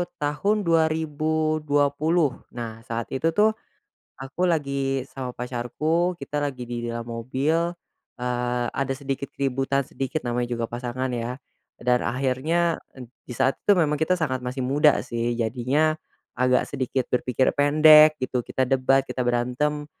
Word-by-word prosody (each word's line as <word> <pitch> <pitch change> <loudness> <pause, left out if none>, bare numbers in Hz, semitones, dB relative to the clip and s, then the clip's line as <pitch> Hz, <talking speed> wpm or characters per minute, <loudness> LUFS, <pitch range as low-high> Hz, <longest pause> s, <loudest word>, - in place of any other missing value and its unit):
tahun 180 +8 0
2020, 155 -2 +1 0.2
nah 115 -2 -6
saat 115 0 -4
itu 160 +5 0
tuh, 215 +1 +5 0.7
aku 135 +7 -5
lagi 140 -4 -1
sama 130 -2 -6
pacarku, 150 +9 -1
kita 145 +1 -3
lagi 130 -4 -4
di 120 0 -4
dalam 115 0 -4
mobil, 135 +8 -1 0.5
eee, 125 0 -1
ada 135 -1 -1
sedikit 135 0 -3
keributan 135 0 -1
sedikit 135 +1 -4
namanya 120 0 -1
juga 115 - -1
pasangan 125 +2 -4
ya, 120 +2 -4 0.4
dan 125 0 +1
akhirnya 140 +7 0 0.4
di - - -16
saat 135 - +3
itu 205 -2 +4
memang 150 -2 +1
kita 180 +3 +2
sangat 130 -6 -1
masih 125 +1 -3
muda 145 +3 +4
sih, 120 0 -2
jadinya, 130 +7 +1 0.4
agak 125 0 +2
sedikit 130 -2 -2
berpikir 125 +1 +1
pendek 155 +1 +7
gitu, 130 -1 -2
kita 130 +2 -1
debat, 135 +1 +2
kita 125 - -3
berantem, 125 +5 0
135 Hz, 135 wpm, -24 LUFS, 125-155 Hz, 0.7 s, pendek